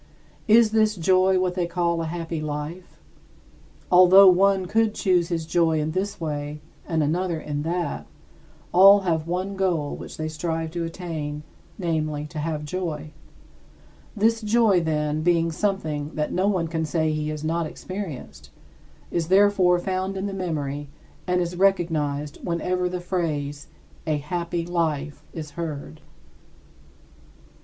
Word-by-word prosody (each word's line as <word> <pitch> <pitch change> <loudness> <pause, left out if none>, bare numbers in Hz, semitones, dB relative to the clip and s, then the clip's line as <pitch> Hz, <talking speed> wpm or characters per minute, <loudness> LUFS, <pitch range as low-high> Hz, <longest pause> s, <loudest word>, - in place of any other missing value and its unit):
Is 220 0 +6
this 215 -1 +3
joy 185 +2 +3
what 185 -1 0
they 180 -2 -1
call 170 -1 0
a 165 - -3
happy 165 -1 -4
life? 155 +4 -6 0.9
Although 185 +2 +8
one 190 +1 +3
could 220 +3 +1
choose 180 -3 +2
his 165 -2 -2
joy 165 -1 +2
in 155 +1 -1
this 190 +4 -3
way 150 -2 -4 0.3
and 160 -2 +1
another 170 +2 -1
in 145 -1 -4
that, 170 +3 -3 0.7
all 195 +2 +8
have 165 -4 -1
one 185 +3 -2
goal 175 -7 0
which - - -9
they 155 - -3
strive 160 +1 -3
to 170 0 -3
attain, 160 -4 -5 0.3
namely, 155 -4 -2
to 155 - -5
have 150 -1 -3
joy. 155 -2 -4 1.0
This 225 +2 +2
joy, 215 -4 +3
then, 150 -1 -1
being 165 0 +2
something 160 -6 -2
that 150 0 -2
no 185 +2 +1
one 185 -5 +1
can 160 0 -2
say 160 0 0
he 155 0 -2
has 155 0 -5
not 165 +1 -1
experienced, 185 -6 -7 0.6
is 165 -2 -1
therefore 190 -1 +4
found 190 +1 -2
in 190 - -3
the 200 - -3
memory 145 -6 -3 0.4
and 180 0 +2
it - - +2
is 175 +1 -5
recognized 155 -6 0
whenever 180 +1 -1
the 180 0 -4
phrase 150 -6 -3 0.4
"a 155 -1 +1
happy 170 +3 -3
life" 155 -4 -2
is 155 -3 -7
heard. 155 -1 -6
170 Hz, 145 wpm, -24 LUFS, 155-185 Hz, 1.0 s, Although